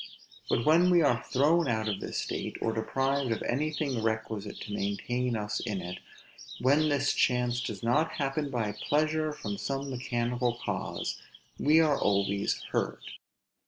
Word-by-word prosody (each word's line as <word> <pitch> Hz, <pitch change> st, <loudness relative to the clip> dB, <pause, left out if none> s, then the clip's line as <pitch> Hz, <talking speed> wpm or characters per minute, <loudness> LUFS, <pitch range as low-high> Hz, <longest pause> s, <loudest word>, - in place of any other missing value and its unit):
But 115 Hz, -, +1 dB
when 170 Hz, +4 st, +5 dB
we 175 Hz, -2 st, +5 dB
are 120 Hz, -4 st, +2 dB
thrown 150 Hz, +4 st, +3 dB
out 110 Hz, -3 st, 0 dB
of 105 Hz, -2 st, -1 dB
this -, -, -4 dB
state, -, -, -3 dB
or 115 Hz, -, 0 dB
deprived 135 Hz, +3 st, 0 dB
of 115 Hz, -, -1 dB
anything 145 Hz, -2 st, -1 dB
requisite 110 Hz, -2 st, -2 dB
to 105 Hz, -, -6 dB
maintain 120 Hz, +5 st, -1 dB
us 105 Hz, 0 st, -2 dB
in 105 Hz, -5 st, -3 dB
it; 90 Hz, 0 st, -6 dB, 0.6 s
when 145 Hz, +4 st, +3 dB
this 140 Hz, -1 st, +2 dB
chance 125 Hz, -1 st, +2 dB
does 120 Hz, -, -5 dB
not 150 Hz, +8 st, +2 dB
happen 140 Hz, +1 st, -1 dB
by 115 Hz, -5 st, -1 dB
pleasure 155 Hz, +8 st, 0 dB
from 105 Hz, -9 st, -5 dB
some 135 Hz, 0 st, -3 dB
mechanical 120 Hz, -1 st, -1 dB
cause, -, -, -3 dB, 0.4 s
we 155 Hz, +2 st, +5 dB
are 150 Hz, -3 st, +2 dB
always 100 Hz, 0 st, +1 dB
hurt. -, -, -1 dB
125 Hz, 155 wpm, -29 LUFS, 110-145 Hz, 0.6 s, when